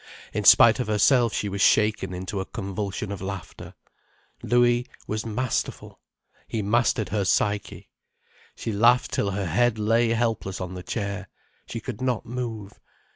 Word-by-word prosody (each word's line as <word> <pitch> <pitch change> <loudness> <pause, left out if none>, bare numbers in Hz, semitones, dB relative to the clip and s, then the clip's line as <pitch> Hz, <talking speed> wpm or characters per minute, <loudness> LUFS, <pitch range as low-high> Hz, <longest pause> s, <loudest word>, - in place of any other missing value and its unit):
In - - -2
spite 115 +2 +7
of 125 - -2
herself 115 +3 +3
she 105 - -2
was 100 0 -3
shaken 105 -3 +3
into 95 +2 -4
a 95 - -3
convulsion 100 0 -5
of 100 - -6
laughter. 95 -1 -7 0.7
Louis 120 +1 +2 0.2
was 110 +1 -3
masterful—he 115 -1 -5
mastered 110 0 +1
her 100 +1 0
psyche. 100 +2 -1 0.6
She 115 - -4
laughed 115 +4 +3
till 100 - 0
her 100 0 -2
head 110 +7 +1
lay 115 +2 +2
helpless 115 -4 -1
on 90 0 -5
the 90 - -6
chair, 100 -1 -4 0.4
she - - -5
could 110 - -7
not 125 -3 -1
move. 115 -4 -6
105 Hz, 145 wpm, -25 LUFS, 100-115 Hz, 0.7 s, spite